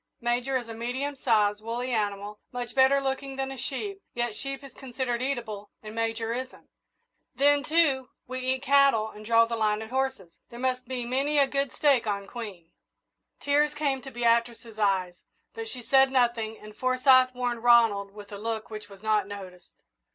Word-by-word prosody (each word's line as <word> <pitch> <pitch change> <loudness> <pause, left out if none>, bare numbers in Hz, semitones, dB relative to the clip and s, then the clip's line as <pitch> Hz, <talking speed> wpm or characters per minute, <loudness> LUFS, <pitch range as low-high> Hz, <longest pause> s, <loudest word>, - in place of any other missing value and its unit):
Major 245 +3 0
is 240 -2 -6
a 225 - -6
medium 250 +5 -3
sized, 215 -5 +2
woolly 240 +3 -3
animal, 205 -2 -2
much 245 -1 -5
better 270 +1 +5
looking 270 0 -3
than 270 0 -3
a 270 - -7
sheep, 390 - -4 0.2
yet 240 -2 -1
sheep 275 +2 -5
is 275 - -11
considered 250 -2 -3
eatable 235 -6 -3
and 215 0 -8
Major 225 0 -1
isn't. 255 +1 -7 0.6
Then, 285 +2 +4
too, 285 -5 +2 0.2
we 255 +1 -4
eat 260 +1 -1
cattle 275 -6 +4
and 210 - -12
draw 230 +1 +5
the 230 0 -3
line 215 -1 +1
at 220 - -11
horses 265 -9 -2 0.2
there 235 - -10
must 255 -1 -1
be 250 -1 -3
many 275 +5 0
a 280 - +6
good 275 0 -1
steak 275 -6 +2
on 200 -1 -2
Queen." 195 -7 -8 0.7
Tears 295 +1 +2
came 280 -3 0
to 270 - -9
Beatrice's 235 -2 0
eyes, 190 -4 +1 0.4
but 455 0 -6
she 250 - -5
said 270 +2 +4
nothing, 235 -4 +1
and 215 0 -13
Forsyth 255 0 +4
warned 245 -2 -2
Ronald 225 -5 +5
with 205 0 -12
a 200 - -7
look 225 0 -4
which 215 -1 -7
was 200 0 -14
not 215 -2 +2
noticed. 185 -3 -11
240 Hz, 180 wpm, -27 LUFS, 215-265 Hz, 0.7 s, a